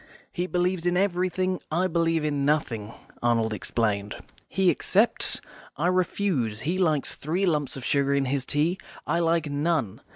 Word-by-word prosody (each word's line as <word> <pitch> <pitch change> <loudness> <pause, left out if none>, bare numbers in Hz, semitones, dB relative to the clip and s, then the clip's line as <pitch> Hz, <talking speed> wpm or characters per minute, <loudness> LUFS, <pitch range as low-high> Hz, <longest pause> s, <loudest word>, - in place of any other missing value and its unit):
"He 180 0 -2
believes 180 -1 0
in 175 0 +2
everything. 185 -1 0
I 170 +4 +1
believe 165 -3 +1
in 145 -2 0
nothing," 120 -8 0 0.3
Arnold 115 -2 +2
explained. 105 0 -1 0.3
"He 190 -2 +3
accepts; 215 +5 +2 0.4
I - - -1
refuse. 175 - 0
He 175 +6 -1
likes 155 -6 +1
three 175 +7 -1
lumps 150 -6 0
of 130 - -7
sugar 140 0 +2
in 140 -1 +1
his 135 0 -1
tea; 155 +7 0 0.3
I 170 +3 +1
like 165 -2 +1
none. 145 - -1
160 Hz, 155 wpm, -26 LUFS, 135-180 Hz, 0.4 s, He